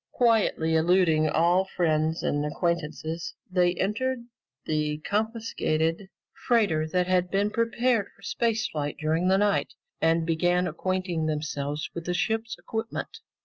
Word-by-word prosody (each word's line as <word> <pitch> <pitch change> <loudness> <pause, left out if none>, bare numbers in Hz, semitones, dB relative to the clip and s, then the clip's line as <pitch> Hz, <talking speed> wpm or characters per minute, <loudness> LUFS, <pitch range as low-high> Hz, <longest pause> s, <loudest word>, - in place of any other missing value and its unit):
Quietly 220 -9 +2
eluding 160 -1 +3
all 175 +4 +3
friends 160 -3 0
and 145 0 0
acquaintances, 165 +1 -2 0.2
they 180 -1 +3
entered 235 +6 -1 0.4
the 150 -1 0
confiscated 205 -6 -1 0.4
freighter 200 -11 +3
that 180 +2 +1
had 180 0 +1
been 200 +2 +1
prepared 230 -1 +1
for - - -22
space 225 -2 0
flight 145 -1 -3
during 160 +3 +1
the 190 +1 +4
night 205 0 +1 0.3
and 165 0 +3
began 175 +2 +2
acquainting 180 -1 -2
themselves 150 -1 -2
with 170 -1 -6
the 180 - -1
ship's 225 +3 -1
equipment. 225 - -5
175 Hz, 130 wpm, -27 LUFS, 160-210 Hz, 0.4 s, the